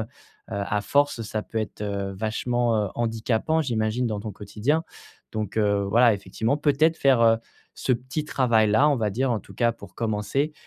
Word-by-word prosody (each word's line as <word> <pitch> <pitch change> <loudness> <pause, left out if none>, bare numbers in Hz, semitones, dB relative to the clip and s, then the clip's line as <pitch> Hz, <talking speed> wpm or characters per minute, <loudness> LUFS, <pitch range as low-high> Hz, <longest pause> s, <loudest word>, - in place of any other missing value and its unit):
heu, - - -5 0.4
à 100 -1 -2
force, 145 -2 +1
ça 110 0 -3
peut 115 - -11
être, 110 -1 -5
heu, 100 -1 -3
vachement, 115 +3 0
heu - - -4
handicapant, 120 +7 0
j'imagine, 115 -1 0
dans 105 -2 -2
ton 110 0 -5
quotidien. 105 - -1 0.5
Donc, 110 0 -4
heu, 100 -2 +2
voilà, 115 +3 +5
effectivement 110 +7 -1
peut-être 155 +3 +2
faire, 130 -4 +4
heu, 115 0 +5 0.4
ce 130 - 0
petit 130 +5 -3
travail 115 -7 +3
là, 130 +8 +4
on 145 - +2
va 110 -3 0
dire 130 +5 0
en 115 - +1
tout - - -15
cas 120 -1 +2
pour - - -14
commencer, 115 +7 -1
115 Hz, 185 wpm, -25 LUFS, 105-130 Hz, 0.5 s, voilà